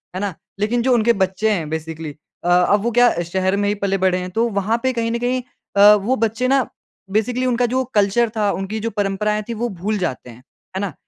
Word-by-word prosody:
है - - -2
ना? 200 -3 -2 0.3
लेकिन 230 +3 +1
जो 255 +1 +2
उनके 235 0 +3
बच्चे 195 +4 0
हैं 165 -7 -1
बेसिकली 160 -1 -5 0.3
अ, 175 - -1
अब 180 +3 +4
वो 235 - +1
क्या 245 +1 +5
शहर 190 +3 0
में 205 0 0
ही 205 - 0
पले 200 -1 -1
बड़े 185 -1 +2
हैं, 180 0 -4
तो 230 +5 +1
वहाँ 210 +4 +1
पे 260 - +2
कहीं 230 -1 -1
न 235 - -1
कहीं 250 +1 0 0.4
अ, 205 +1 +9
वो 210 +6 0
बच्चे 230 +2 0
ना 270 -3 +2 0.4
बेसिकली 245 +4 0
उनका 245 -1 +1
जो 255 +2 0
कल्चर 205 +3 +3
था, 205 -2 +2
उनकी 195 +3 -4
जो 225 +2 -2
परंपराएँ 210 0 -1
थीं - - -2
वो 240 +2 -2
भूल 205 +2 -3
जाते 130 -9 -4
हैं। 120 +1 -14 0.3
है - - -1
ना? 200 -6 -3
210 Hz, 235 wpm, -20 LUFS, 190-235 Hz, 0.4 s, अ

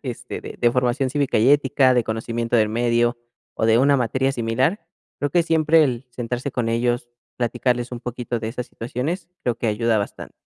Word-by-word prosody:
este, 125 -2 -6
de - - -9
de 120 -1 +3
formación 125 +2 +1
cívica 140 -1 0
y 115 +5 +4
ética, 135 -2 +4
de 125 -1 +3
conocimiento 115 +1 -2
del 110 -2 +3
medio, 120 +1 +1 0.3
o 110 - -1
de 115 0 +5
una 140 +2 +4
materia 130 +3 0
similar, 130 - 0 0.4
creo 145 - +1
que 175 +3 +3
siempre 160 -1 +4
el 125 -2 -2
sentarse 125 +2 -4
con 120 -3 -1
ellos, 120 +1 0 0.3
platicarles 120 0 -1
un 120 - -5
poquito 120 0 -4
de 110 - -3
esas 125 +1 -5
situaciones, 145 +11 -4
creo 120 - 0
que 120 - -4
ayuda 110 +1 +1
bastante. 100 - -5
125 Hz, 190 wpm, -22 LUFS, 115-135 Hz, 0.4 s, de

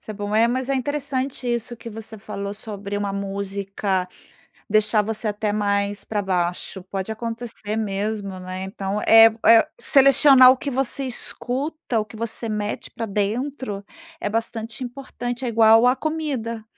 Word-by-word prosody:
isso - - -11
é - - -6
bom. 205 0 -5
É, 225 +2 +4
mas 255 +2 -2
é 275 - 0
interessante 270 -2 -1
isso 240 0 -3
que 230 - -10
você 220 0 -8
falou 200 -1 -6
sobre 205 -1 -6
uma 205 -1 -3
música 195 -1 -3 0.6
deixar 215 0 +2
você 220 +1 -3
até 210 0 -2
mais 200 -1 -1
pra 210 -2 -3
baixo, 180 0 -3
pode 190 +2 -5
acontecer 230 -1 -5
mesmo, 205 -2 -3
né. 185 +1 -7
Então 195 +1 -4
é 225 0 +8
v 220 - -14
é 230 0 +6
selecionar 275 -1 +8
o - - -3
que 280 - -5
você 270 +1 +2
escuta, 260 +2 -1
o - - -3
que 215 +1 -14
você 230 +1 -2
mete 210 -1 -4
pra 225 - -5
dentro 210 +1 -3 0.4
é 205 - -3
bastante 225 +2 -3
importante. 245 -1 -6
É - - -1
igual 225 0 +5
a 250 - +2
comida, 270 -9 -4
220 Hz, 165 wpm, -22 LUFS, 200-245 Hz, 0.6 s, é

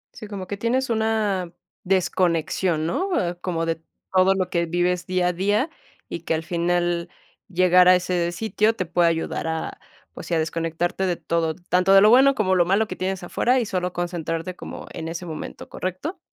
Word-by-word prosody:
Sí, 220 -3 -9
como 200 -3 -6
que 205 - -5
tienes 245 +4 0
una 215 -5 0 0.3
desconexión, 175 -3 +1
¿no?, 370 - -1
ah, 175 -2 0
como 165 -3 -2
de 165 0 -2 0.3
todo 190 +1 +4
lo 185 -1 0
que 170 -1 0
vives 175 +1 0
día 185 -1 +1
a - - -1
día, 205 - +1 0.4
y - - -5
que 165 0 -1
al 160 - -3
final 175 0 0 0.4
llegar 180 -1 +5
a 185 - +8
ese 175 -1 0
sitio 220 +3 +1
te 185 - -2
puede 170 0 +3
ayudar 165 0 -2
a, 160 0 -4 0.3
pues, - - -9
sí, 170 - 0
a - - +2
desconectarte 165 +3 -1
de 175 - 0
todo, 165 -2 -1
tanto 180 +1 +2
de 195 - +8
lo 210 +2 +7
bueno 270 +3 +6
como 190 -5 +1
lo 180 -2 +4
malo 200 +5 +2
que 185 - -6
tienes 190 0 -3
afuera, 250 +8 +1
y 235 - -1
solo 180 -2 -2
concentrarte 175 0 -3
como - - -8
en 160 -2 -5
ese 170 +2 -5
momento, 160 -2 -7
¿correcto? 185 - -5
180 Hz, 195 wpm, -23 LUFS, 170-195 Hz, 0.4 s, a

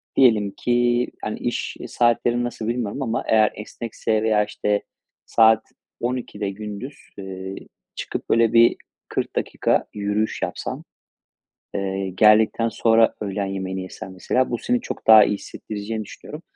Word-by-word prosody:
diyelim 110 -6 +4
ki, 120 0 +2 0.2
hani, 105 - -3
iş 120 - -3
saatlerini 120 0 +2
nasıl 115 -2 -4
bilmiyorum 120 +1 -2
ama 115 -3 -1
eğer 110 -1 +4
esnekse 110 0 -3
veya, 105 -1 +3
işte, 105 0 -1 0.4
saat 110 -1 +5 0.4
12.00'de 120 -5 -3
gündüz, 105 +7 -7 0.2
ııı, 95 0 -6 0.4
çıkıp - - -5
böyle 115 -1 +3
bir 115 0 +6 0.3
40 - - -3
dakika - - 0
yürüyüş 105 +1 -1
yapsan, - - -4 0.9
eee, 95 -1 -2
geldikten 105 +4 +4
sonra 115 0 +3
öğlen 100 -1 -2
yemeğini 95 -1 -4
yesen 95 0 -8
mesela, 125 +7 0
bu 120 - 0
seni 245 - 0
çok - - -7
daha 110 -1 +10
iyi - - +1
hissettireceğini 110 +2 -6
düşünüyorum. 150 +9 -10
110 Hz, 135 wpm, -22 LUFS, 100-120 Hz, 0.9 s, daha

